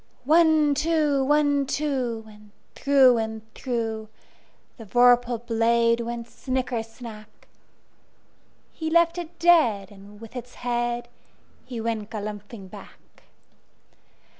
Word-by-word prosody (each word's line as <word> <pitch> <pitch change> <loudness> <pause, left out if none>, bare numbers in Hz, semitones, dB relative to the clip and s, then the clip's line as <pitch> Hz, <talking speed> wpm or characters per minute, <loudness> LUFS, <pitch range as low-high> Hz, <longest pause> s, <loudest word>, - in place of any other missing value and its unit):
One, 315 -1 +4
two! 300 -2 +1
One, 285 0 +2
two! 260 -6 -2
And 210 -1 -16 0.2
through 265 -4 +4
and 220 0 -6
throughThe 225 -4 -3 0.7
vorpal 245 +1 +3
blade 230 0 +2
went 235 0 -5
snicker 250 0 -3
snack! 225 -1 -12 1.2
He 320 -1 -4
left 335 +1 +3
it 345 0 -8
dead, 240 - +3
and 205 +1 -15
with 230 +2 -12
its 245 0 -8
headHe 240 0 -2 0.7
went 220 -2 -3
galumphing 210 -1 -7
back. - - -15
240 Hz, 100 wpm, -25 LUFS, 225-280 Hz, 1.2 s, One